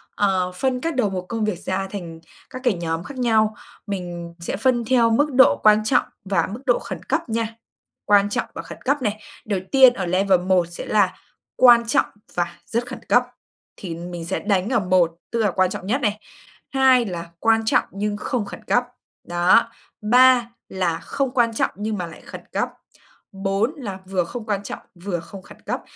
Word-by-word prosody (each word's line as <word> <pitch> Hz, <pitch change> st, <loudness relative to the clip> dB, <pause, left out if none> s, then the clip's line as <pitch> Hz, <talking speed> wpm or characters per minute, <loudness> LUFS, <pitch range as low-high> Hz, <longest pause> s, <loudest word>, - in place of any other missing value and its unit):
ờ, 190 Hz, -3 st, +1 dB
phân 255 Hz, +3 st, -1 dB
các 330 Hz, -2 st, -2 dB
đầu 250 Hz, -5 st, +2 dB
mục 185 Hz, -1 st, -4 dB
công 225 Hz, -2 st, -1 dB
việc 205 Hz, -5 st, -2 dB
ra 195 Hz, +1 st, -2 dB
thành 170 Hz, -5 st, -7 dB, 0.3 s
các 255 Hz, -, -8 dB
cái 245 Hz, -, +4 dB
nhóm 165 Hz, -2 st, -3 dB
khác 280 Hz, +4 st, -9 dB
nhau, 220 Hz, -3 st, +2 dB, 0.3 s
mình 175 Hz, -3 st, -5 dB
sẽ 170 Hz, -, -4 dB
phân 240 Hz, +1 st, +1 dB
theo 235 Hz, -1 st, +4 dB
mức 290 Hz, +5 st, +2 dB
độ 260 Hz, +1 st, +6 dB
quan 215 Hz, 0 st, +6 dB
trọng 245 Hz, +2 st, +3 dB, 0.2 s
và 195 Hz, 0 st, +1 dB
mức 230 Hz, -, -6 dB
độ 245 Hz, -3 st, +3 dB
khẩn 190 Hz, -3 st, -7 dB
cấp -, -, -2 dB
nha, 225 Hz, 0 st, -2 dB, 0.5 s
quan 205 Hz, 0 st, +4 dB
trọng -, -, -1 dB
và -, -, -4 dB
khẩn -, -, -11 dB
cấp 280 Hz, +2 st, +1 dB
này. 215 Hz, -2 st, -2 dB, 0.2 s
Đầu 200 Hz, -3 st, -1 dB
tiên 260 Hz, -2 st, +7 dB
ở 190 Hz, -5 st, -3 dB
level 185 Hz, +1 st, +3 dB
1 185 Hz, -1 st, +2 dB
sẽ 175 Hz, -, -7 dB
là 200 Hz, -3 st, +2 dB, 0.4 s
quan 240 Hz, -2 st, +7 dB
trọng -, -, +3 dB, 0.3 s
và 170 Hz, -1 st, -2 dB
rất 235 Hz, +2 st, -2 dB
khẩn -, -, -7 dB
cấp, 245 Hz, -, +5 dB, 0.5 s
thì 175 Hz, -4 st, -6 dB
mình 175 Hz, 0 st, -7 dB
sẽ -, -, -2 dB
đánh 200 Hz, -1 st, 0 dB
ở 245 Hz, -, +2 dB
1, 180 Hz, -3 st, +2 dB
tức 235 Hz, -, -1 dB
là 210 Hz, -3 st, +2 dB
quan 185 Hz, +1 st, +2 dB
trọng 185 Hz, -, -6 dB
nhất 255 Hz, +6 st, 0 dB
này, 210 Hz, -2 st, 0 dB, 0.5 s
2 260 Hz, -3 st, +4 dB
là 170 Hz, -3 st, -5 dB
quan 225 Hz, +2 st, +2 dB
trọng -, -, +3 dB
nhưng 205 Hz, +1 st, -2 dB
không 235 Hz, -1 st, -2 dB
khẩn -, -, -10 dB
cấp, 245 Hz, -, +2 dB, 0.4 s
đó, 175 Hz, +7 st, +4 dB, 0.3 s
3 245 Hz, +2 st, +5 dB, 0.2 s
là 175 Hz, -3 st, -1 dB
không 275 Hz, -2 st, -2 dB
quan 235 Hz, -3 st, +2 dB
trọng -, -, 0 dB
nhưng 210 Hz, +2 st, -3 dB
mà 180 Hz, -2 st, -3 dB
lại 165 Hz, -, -12 dB
khẩn -, -, -10 dB
cấp, -, -, 0 dB, 0.6 s
4 195 Hz, +6 st, -1 dB
là 200 Hz, -8 st, -6 dB
vừa 185 Hz, -1 st, 0 dB
không 235 Hz, +5 st, -7 dB
quan 205 Hz, -2 st, -2 dB
trọng, -, -, -6 dB, 0.2 s
vừa 175 Hz, 0 st, -4 dB
không 190 Hz, +4 st, -11 dB
khẩn -, -, -15 dB
cấp. -, -, -2 dB
205 Hz, 205 wpm, -22 LUFS, 185-240 Hz, 0.6 s, tiên